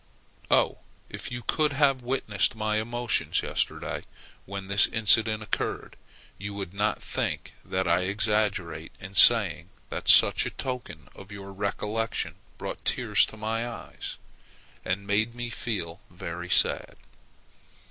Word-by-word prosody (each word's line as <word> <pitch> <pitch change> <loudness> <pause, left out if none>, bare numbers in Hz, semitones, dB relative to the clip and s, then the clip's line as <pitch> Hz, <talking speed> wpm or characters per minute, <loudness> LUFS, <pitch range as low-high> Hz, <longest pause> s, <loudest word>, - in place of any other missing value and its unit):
Oh! - - +3 0.3
if - - -6
you 120 0 -5
could 150 +5 +1
have 135 -2 +3
witnessed 120 -5 0
my 110 -1 0
emotions 120 +1 0
yesterday - - -2 0.4
when 100 0 -5
this 100 +2 +5
incident 110 0 +4
occurred, 105 - -3 0.4
you 100 +1 -5
would 95 -3 -6
not 105 +2 -1
think - - -3
that 95 0 -1
I 85 +2 +3
exaggerate 100 -5 -1
in 95 0 -9
saying 95 -6 +6 0.2
that - - -5
such - - +7
a - - -2
token 125 -2 -6
of 100 +1 -13
your 100 -1 -8
recollection 105 +3 -2 0.2
brought - - -6
tears - - +2
to 110 - -11
my 115 +2 -2
eyes, 115 - -7 0.7
and 95 +2 -2
made 110 +4 0
me 120 -1 -5
feel 90 -8 -4
very 90 0 -7
sad. - - +3
105 Hz, 135 wpm, -27 LUFS, 95-115 Hz, 0.7 s, such